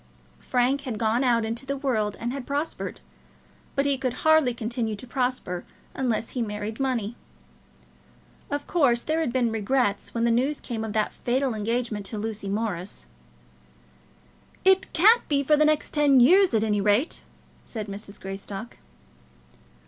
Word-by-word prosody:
Frank 255 Hz, +3 st, +1 dB
had 250 Hz, -6 st, -4 dB
gone 225 Hz, +3 st, +1 dB
out 235 Hz, -3 st, +2 dB
into 230 Hz, +3 st, -3 dB
the 275 Hz, +1 st, -3 dB
world 220 Hz, -7 st, -1 dB
and 240 Hz, +2 st, -3 dB
had 275 Hz, -2 st, -6 dB
prospered, 290 Hz, +3 st, -3 dB, 0.7 s
but 275 Hz, 0 st, +1 dB
he 280 Hz, -2 st, +1 dB
could 255 Hz, -3 st, -1 dB
hardly 315 Hz, -5 st, +5 dB
continue 230 Hz, -1 st, -3 dB
to 205 Hz, -, -9 dB
prosper 250 Hz, -8 st, -2 dB, 0.3 s
unless 235 Hz, -4 st, -1 dB
he 250 Hz, -, -2 dB
married 210 Hz, 0 st, -4 dB
money. 240 Hz, -5 st, -1 dB, 1.3 s
Of 285 Hz, 0 st, -3 dB
course, 260 Hz, -9 st, +3 dB
there 315 Hz, +1 st, 0 dB
had 315 Hz, -7 st, 0 dB
been 240 Hz, -2 st, +1 dB
regrets 220 Hz, -1 st, 0 dB
when 230 Hz, -, 0 dB
the 235 Hz, -, +3 dB
news 265 Hz, +5 st, +1 dB
came 225 Hz, -3 st, -5 dB
of 220 Hz, -2 st, -4 dB
that 215 Hz, 0 st, 0 dB
fatal 255 Hz, +1 st, 0 dB
engagement 220 Hz, -1 st, -2 dB
with 215 Hz, -, -4 dB
Lucy 215 Hz, -2 st, -4 dB
Morris. 200 Hz, -, -3 dB, 1.6 s
"It 380 Hz, 0 st, +4 dB
can't 435 Hz, +8 st, +5 dB
be 280 Hz, -1 st, +1 dB
for 300 Hz, +2 st, +4 dB
the 305 Hz, +1 st, +4 dB
next 305 Hz, 0 st, +1 dB
ten 290 Hz, -3 st, +5 dB
years, 355 Hz, +4 st, +6 dB
at 220 Hz, -, +2 dB
any 210 Hz, -2 st, +1 dB
rate," 210 Hz, +9 st, +1 dB, 0.4 s
said 220 Hz, -3 st, -6 dB
Mrs. 200 Hz, 0 st, -9 dB
Greystock. 195 Hz, +3 st, -7 dB
240 Hz, 155 wpm, -25 LUFS, 215-275 Hz, 1.6 s, years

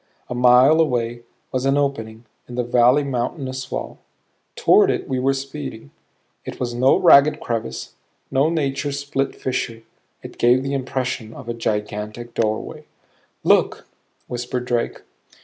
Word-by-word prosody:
A -, -, -3 dB
mile 125 Hz, +5 st, +5 dB
away 120 Hz, -5 st, -1 dB, 0.3 s
was 130 Hz, -1 st, -1 dB
an 135 Hz, +1 st, +2 dB
opening 115 Hz, -5 st, -2 dB, 0.2 s
in 120 Hz, -, -8 dB
the 125 Hz, -, 0 dB
valley's 125 Hz, +4 st, +4 dB
mountainous 130 Hz, +1 st, -3 dB
wall; -, -, -5 dB, 0.6 s
toward -, -, +5 dB
it -, -, -1 dB
we 130 Hz, -1 st, -1 dB
were 135 Hz, +2 st, +1 dB
speeding. 135 Hz, -, -7 dB, 0.5 s
It -, -, -8 dB
was 120 Hz, -1 st, -2 dB
no 130 Hz, +3 st, +4 dB
ragged 140 Hz, +2 st, +6 dB
crevice, 110 Hz, -, -4 dB, 0.4 s
no 135 Hz, +3 st, +3 dB
nature 145 Hz, -3 st, -1 dB
split 140 Hz, -1 st, -2 dB
fissure; 115 Hz, -3 st, -3 dB, 0.4 s
it -, -, -11 dB
gave 125 Hz, +2 st, +4 dB
the 135 Hz, 0 st, -3 dB
impression 130 Hz, -4 st, -3 dB
of 135 Hz, -, -10 dB
a 120 Hz, -, -2 dB
gigantic 105 Hz, +1 st, -4 dB
doorway. 110 Hz, -1 st, -2 dB, 0.6 s
"Look," -, -, +2 dB, 0.4 s
whispered 125 Hz, 0 st, -4 dB
Drake. 120 Hz, -1 st, -2 dB
125 Hz, 140 wpm, -21 LUFS, 120-135 Hz, 0.6 s, ragged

